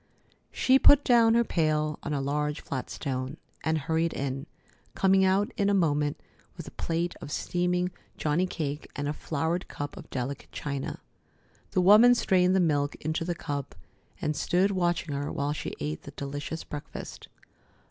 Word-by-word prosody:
She 265 +1 +4
put 285 +1 +7
down 230 -2 +5
her 235 - +5
pail 155 -5 0
on 150 - -4
a 145 - 0
large 150 +2 -1
flat 130 -2 -5
stone, 130 +1 -4 0.3
and 160 0 +1
hurried 160 +3 0
in, 135 +1 -3 0.5
coming 190 0 +4
out 195 +5 +2
in 200 -2 +2
a 200 - +3
moment 150 -5 +1 0.4
with - - -8
a - - -8
plate 170 +1 -2
of 145 - -7
steaming 180 +3 0 0.3
johnny 155 +5 +1
cake 150 -4 -4
and 145 0 -2
a 145 - -1
flowered 160 +4 -2
cup 145 0 -6
of - - -11
delicate 130 +2 -4
china. 140 -2 -4 0.7
The 185 - +1
woman 215 +6 +8
strained 185 -5 +3
the - - +4
milk 145 -4 +1
into 155 +2 -2
the 175 +1 -2
cup 145 -4 -5 0.4
and 150 0 -1
stood 185 +6 +2
watching 175 -5 0
her 140 +1 -2
while 145 +1 -1
she - - -5
ate 75 +2 -3
the - - -10
delicious 145 +3 -5
breakfast. 145 -1 -8
160 Hz, 170 wpm, -28 LUFS, 145-180 Hz, 0.7 s, woman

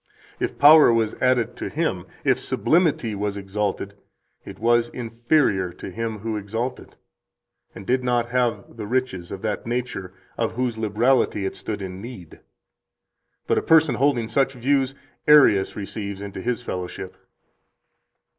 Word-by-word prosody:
If - - -2
power 150 -2 +8
was 115 -2 +1
added 125 -2 +2
to - - -4
Him, - - -2 0.2
if - - +2
Sublimity 155 -9 +1
was 100 0 -3
exalted, 100 0 -3 0.5
it - - -10
was 120 +1 +2
inferior 115 - 0
to - - -8
Him 115 -1 -4
who 110 0 -3
exalted, 115 +5 -5 0.8
and 95 - -9
did 130 +4 +1
not 120 -1 0
have 120 -1 -1
the 105 -2 -5
riches 120 -8 -2
of 100 -1 -7
that 110 +1 -3
nature 120 -6 -3 0.3
of 115 -1 0
whose 125 -1 -1
liberality 110 -1 +1
it 95 - -3
stood 105 -2 -5
in 95 0 -7
need. 110 -8 -10 1.1
But - - +2
a - - -4
person 160 -4 +4
holding 125 -3 +1
such 135 +2 +1
views 135 +1 0 0.3
Arius 145 -10 +6
receives 100 -1 -5
into 100 -1 -7
his 125 +2 -2
fellowship." 90 -3 -6
115 Hz, 145 wpm, -23 LUFS, 100-125 Hz, 1.1 s, power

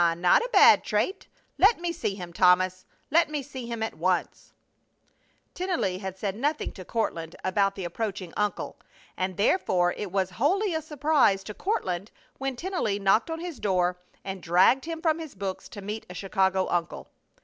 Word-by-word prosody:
Ah! 165 -1 +3
Not 175 - +4
a 480 - -3
bad - - +7
trait. 385 +1 -1 0.3
Let 410 +2 +5
me 345 0 -2
see 335 -12 -3
him, 175 -3 -8
Thomas! 185 +1 +3 0.3
Let 330 0 +4
me 300 -2 -3
see 260 -3 -8
him 230 -1 -3
at 220 - -3
once!" 180 +2 -1 1.0
Tennelly 345 - -1
had 190 -1 -6
said 195 -1 -3
nothing 295 +7 -1
to 185 - -10
Courtland 170 -6 -3
about 195 +1 +1
the 190 - -5
approaching 185 -1 -4
uncle, 210 0 -2 0.4
and 185 -1 -3
therefore 185 - +2
it 205 -3 -5
was 190 -1 0
wholly 380 +6 +2
a 320 - -1
surprise 295 -9 +2
to 210 - -7
Courtland 200 - -2 0.3
when 270 -1 -2
Tennelly 325 - -1
knocked 200 +7 +2
on 325 0 -4
his 340 -7 -6
door 180 -3 +1 0.3
and 190 -1 -5
dragged 185 - +4
him 325 -1 -5
from 320 -1 +2
his 315 -7 -8
books 190 -1 -5
to 205 - -9
meet 210 +2 -5
a 180 - -9
Chicago 190 0 +1
uncle. 170 -1 -2
200 Hz, 180 wpm, -27 LUFS, 185-300 Hz, 1.0 s, bad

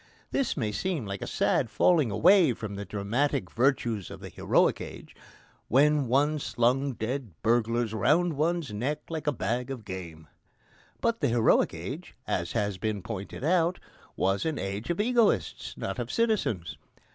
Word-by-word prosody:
This 270 -9 0
may 110 -6 -1
seem 160 - -2
a 100 0 -4
sad - - +1
falling 160 -9 +3
away 165 - +5
from 110 -2 -6
the 100 0 -5
dramatic 105 - -1
virtues 120 -5 +1
of - - -9
the - - -8
heroic - - +2
age, - - -9 0.5
when 145 +2 +4
one 145 +5 +2
slung 130 +2 +1
dead 120 -2 -4
burglars 115 0 +1
round 150 - +2
one's 155 -3 -1
neck 130 +8 -2
like 160 -2 -5
a - - +4
bag 125 -1 -2
of 125 -6 -6
game. 85 -5 -8 0.7
But 230 0 0
the 145 - +3
heroic 115 -7 +3
age, 130 - -7
as 85 -6 -2
has 100 -2 -1
been 105 -1 -2
pointed 100 +3 -6
out, 170 +2 +2 0.4
was 95 +1 +1
an 160 -3 -1
age 100 +3 -4
of 175 - -1
egoists, 235 0 +1
not - - -4
of - - -3
citizens. 215 - 0
125 Hz, 155 wpm, -28 LUFS, 105-155 Hz, 0.7 s, away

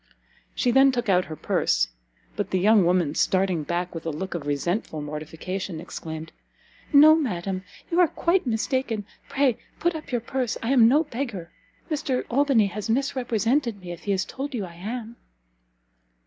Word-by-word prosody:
She 245 - +2
then 270 +2 +6
took 240 -4 -2
out 180 -1 +4
her 155 - -7
purse; - - +1 0.5
but - - -2
the 185 - +1
young 205 +2 +5
woman, 175 -4 +2
starting 185 -1 +1
back 175 +3 -2
with 165 - -6
a 165 - -2
look 185 +5 -4
of 160 -4 -5
resentful 155 - -1
mortification, 160 +4 -5
exclaimed, 160 0 -7 0.6
"No, 305 +2 +9
madam! 190 - -1 0.3
you 340 - +2
are 355 - +6
quite 340 0 +1
mistaken; 230 -1 -1 0.2
pray 270 -4 +2 0.2
put 345 +1 +1
up 310 -3 -7
your 240 -2 0
purse; 250 0 -2
I 230 - 0
am 240 -4 +7
no 290 +6 +4
beggar! 235 - -5 0.4
Mr 290 -4 -1
Albany 270 -4 +4
has 205 +2 -4
misrepresented 245 -2 0
me, 180 -2 -8
if 175 - -9
he 205 - 0
has 190 -1 +1
told 275 +1 -5
you 210 -5 -2
I 170 - -11
am." 225 +6 -6
215 Hz, 170 wpm, -25 LUFS, 175-265 Hz, 0.6 s, No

